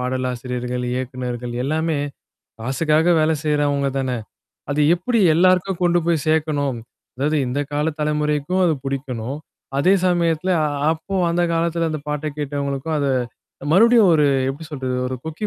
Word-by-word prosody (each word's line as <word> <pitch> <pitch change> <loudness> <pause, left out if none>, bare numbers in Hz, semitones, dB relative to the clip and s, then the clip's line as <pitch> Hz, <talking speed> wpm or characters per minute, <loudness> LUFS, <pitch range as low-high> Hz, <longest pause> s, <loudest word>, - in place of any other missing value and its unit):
பாடலாசிரியர்கள், 125 -1 -3
இயக்குனர்கள் 125 -1 -4
எல்லாமே 160 +1 0 0.6
காசுக்காக 155 +7 +2
வேல 155 +1 +3
செய்றவங்க 145 -2 +1
தானே! 130 -2 -1 0.5
அது 145 +1 0
எப்பிடி 230 +6 0
எல்லாருக்கும் 185 +1 +3
கொண்டு 175 0 +3
போய் 165 -4 +1
சேக்கணும் 145 -5 0 0.4
அதாவது 150 +4 0
இந்த 125 +4 -1
கால 150 +1 0
தலைமுறைக்கும் 150 +3 0
அது 165 -3 +3
புடிக்கணும், 135 -1 -4 0.4
அதே 185 +7 +4
சமயத்தில, 170 0 +1
அ, - - +2 0.3
அப்போ 165 +5 -6 0.2
அந்த 175 +1 +1
காலத்தில 165 0 0
அந்த 155 -1 -3
பாட்ட 150 +1 -2
கேட்டவங்களுக்கும் 140 +1 -2
அத 140 - 0 0.7
மறுபடியும், 225 +1 +6
ஒரு 150 -2 +4 0.2
எப்பிடி 150 +4 -8
சொல்றது? 130 -4 -3
ஒரு 130 - -4
கொக்கி 160 +6 -4
150 Hz, 135 wpm, -21 LUFS, 135-165 Hz, 0.7 s, மறுபடியும்